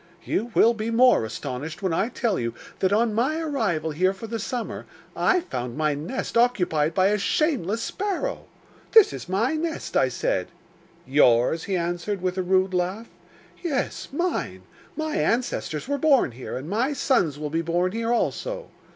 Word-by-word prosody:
'You 230 +4 -1
will 230 - +6
be 220 0 -3
more 245 - +5
astonished 130 - -6
when 185 -3 +1
I 200 +7 +1
tell 230 -5 -1
you 115 -1 -3 0.2
that 190 - +2
on 220 +2 +2
my 265 +9 +1
arrival 215 - -1
here 185 +5 +1
for 210 - -8
the 225 0 -4
summer 235 +2 -4 0.3
I 365 - +3
found 125 - -5
my 155 -1 +1
nest 155 - -4
occupied 180 -10 +2
by 190 +1 +4
a 210 0 +1
shameless 230 - 0
sparrow! 410 +5 -3 0.5
"This 435 -2 +7
is - - -7
my 220 +9 +1
nest," 320 +1 -3
I - - +4
said. - - -1 0.6
"Yours?" 130 +2 +3
he 195 -2 0
answered, 175 +4 -2
with 180 0 -1
a - - +2
rude 185 +1 +2
laugh. 185 +6 -2 0.5
"Yes, 295 -7 -2
mine; 345 +5 -2 0.3
my 315 +1 -2
ancestors 230 - -1
were 285 0 -1
born 275 - +4
here, 125 +2 -6
and 135 +4 -7
my 235 - 0
sons 195 - +1
will 150 -1 -4
be 165 +1 0
born 175 +2 0
here 230 +2 -2
also." - - -1
205 Hz, 170 wpm, -25 LUFS, 165-260 Hz, 0.6 s, This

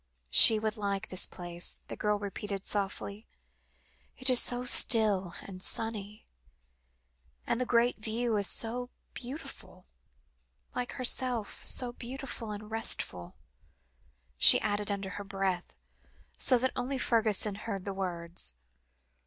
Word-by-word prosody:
"She 220 - +11
would 215 +1 -3
like 200 0 -4
this 185 - 0
place," 175 -1 -5
the - - -7
girl 210 -1 -1
repeated 200 -1 -6
softly. 200 +1 -4 0.9
"It 260 0 +2
is 250 - +7
so 245 0 -1
still 210 -7 +4
and 185 -2 -10
sunny, 215 0 -3 1.2
and 240 - -1
the 250 - -2
great 235 0 +1
view 225 +1 -2
is 200 -2 +2
so 245 +2 -1 0.2
beautiful 260 +6 -10 0.9
like 245 0 -4
herself, 250 -3 -1
so 245 -1 0
beautiful 250 -2 -7
and 210 +1 -8
restful," 90 - -3 1.0
she - - +9
added 205 -1 -2
under 200 -1 -4
her - - -7
breath, 195 -2 -4 0.6
so 255 - +2
that 260 +2 0
only 260 +2 -3
Fergusson 220 -4 +1
heard 200 -2 -7
the 200 - -4
words. 170 - -4
215 Hz, 125 wpm, -29 LUFS, 195-240 Hz, 1.2 s, She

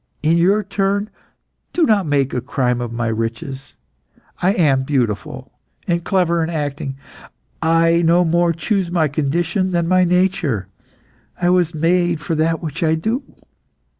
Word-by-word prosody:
In 160 +2 +3
your 195 +5 +3
turn, 200 +1 -1 0.6
do 350 - +2
not 210 - +2
make 140 -2 +1
a 125 - -1
crime 125 -1 -1
of 120 -1 -4
my 120 +1 -3
riches. 115 +4 -4 0.7
I 185 +3 +3
am 145 -8 +2
beautiful, 120 -8 -2 0.4
and 170 -1 0
clever 175 -3 +1
in 160 - -2
acting. 145 -4 -3 0.7
I 165 +1 +3
no 170 +2 +4
more 170 +1 +2
chose 185 +2 -1
my 170 -3 +1
condition 170 +6 -1
than 170 -1 +1
my 185 +1 +4
nature. 180 - +1 0.7
I 175 0 +2
was 175 -3 +1
made 170 +1 +1
for 160 - -3
that 160 +2 0
which 155 0 -5
I 160 -1 +2
do. 220 - -1
165 Hz, 150 wpm, -19 LUFS, 140-180 Hz, 0.7 s, no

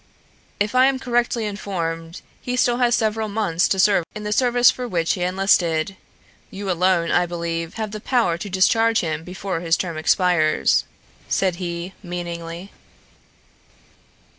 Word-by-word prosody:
"If 205 +2 0
I 255 +1 +5
am 270 -1 +1
correctly 240 -3 0
informed 170 -5 -4 0.2
he 250 - -3
still 245 -1 +2
has 240 -1 +3
several 220 0 0
months 200 -5 +1
to 195 - 0
serve 195 -2 +4
in 215 - -6
the 210 0 -1
service 245 0 +4
for 250 -1 -5
which 170 -6 0
he 180 - -5
enlisted. 180 -2 +1 0.5
You 195 -1 -4
alone, 180 -1 +2
I 175 0 +2
believe, 165 -1 -4
have 220 -2 -4
the 215 0 -6
power 230 -10 +1
to 185 +4 -6
discharge 225 +4 +3
him 160 -2 -3
before 185 0 -4
his 165 -1 +1
term 170 -3 -4
expires," 160 -1 +2 0.4
said 185 -3 +1
he 175 0 -5
meaningly. 175 0 -6
190 Hz, 150 wpm, -22 LUFS, 170-220 Hz, 0.5 s, I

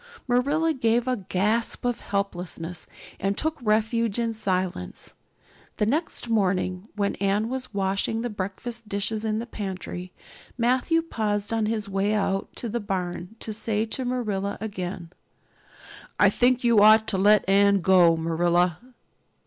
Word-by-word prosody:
Marilla 285 +7 +2
gave 240 -2 +1
a 255 - +2
gasp 210 +4 -1
of 245 -1 0
helplessness 180 -4 -4 0.3
and 195 +1 -1
took 315 0 -1
refuge 220 0 +1
in 230 -1 0
silence. 185 - -3 0.6
The 210 - +2
next 295 +2 -1
morning, 190 -3 0
when 200 -1 0
Anne 200 +3 +1
was 255 -1 -5
washing 200 +3 -1
the 245 - -2
breakfast 210 +3 -6
dishes 210 +2 -2
in 215 -1 0
the 230 - -3
pantry, 190 -4 -6 0.5
Matthew 255 +7 +2
paused 210 -8 -2
on 220 -1 +1
his 220 -1 -2
way 200 +2 0
out 195 -2 0
to 240 - -3
the 235 +2 -2
barn 185 -1 -4
to 220 - -3
say 215 0 -1
to 245 +4 -3
Marilla 215 -6 -2
again: 185 -5 -5 1.1
"I - - +6
think 250 0 +2
you 235 -3 +5
ought 215 +1 +7
to 190 - 0
let 205 +1 +5
Anne 200 0 +4
go, 175 -2 +5
Marilla." 170 +1 +1
210 Hz, 145 wpm, -25 LUFS, 190-230 Hz, 1.1 s, ought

